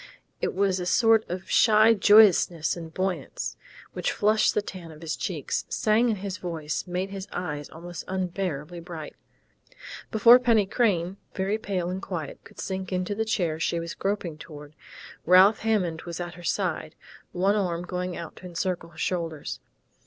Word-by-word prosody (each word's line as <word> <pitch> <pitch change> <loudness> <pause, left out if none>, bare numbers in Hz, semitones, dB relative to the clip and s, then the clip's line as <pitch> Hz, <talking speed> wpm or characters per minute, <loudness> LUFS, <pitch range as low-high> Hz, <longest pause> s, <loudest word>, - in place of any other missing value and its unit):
It - - -1
was 190 -1 +1
a 180 - -3
sort 225 +1 +4
of 180 +2 -5
shy 220 0 +5
joyousness 195 -6 +5
and 165 -2 -8
buoyance, 185 +2 -3 0.4
which - - -1
flushed 215 +1 +2
the 210 - +2
tan 180 -4 -8
of 155 0 -13
his 160 -1 -2
cheeks, 160 -8 -3
sang 225 +3 +2
in 220 - +1
his 195 -1 -5
voice, 165 -4 -4
made 180 +2 -3
his 195 0 -6
eyes 150 -5 -4
almost 175 +1 -8
unbearably 180 -4 -3
bright.... 165 -3 -8 0.9
Before 235 +3 +7
Penny 230 -5 +3
Crain, 190 -4 0 0.2
very 195 +3 -1
pale 185 -4 -2
and 190 +1 -4
quiet, 165 -8 -6
could - - -16
sink 190 0 -4
into 185 +2 -1
the 220 +2 -1
chair 175 -8 -1
she 170 +1 0
was 170 0 -5
groping 190 -6 -3
toward, 150 -2 -11 0.5
Ralph 185 +5 +6
Hammond 190 -8 0
was 170 0 -7
at 175 -1 -5
her 175 - -12
side, 170 -4 -2 0.4
one 190 +3 +2
arm 175 -4 -1
going 180 0 -4
out 165 -2 -7
to 185 - -9
encircle 175 -1 -3
her 160 - -20
shoulders. 165 -3 -3
180 Hz, 165 wpm, -26 LUFS, 170-200 Hz, 0.9 s, Before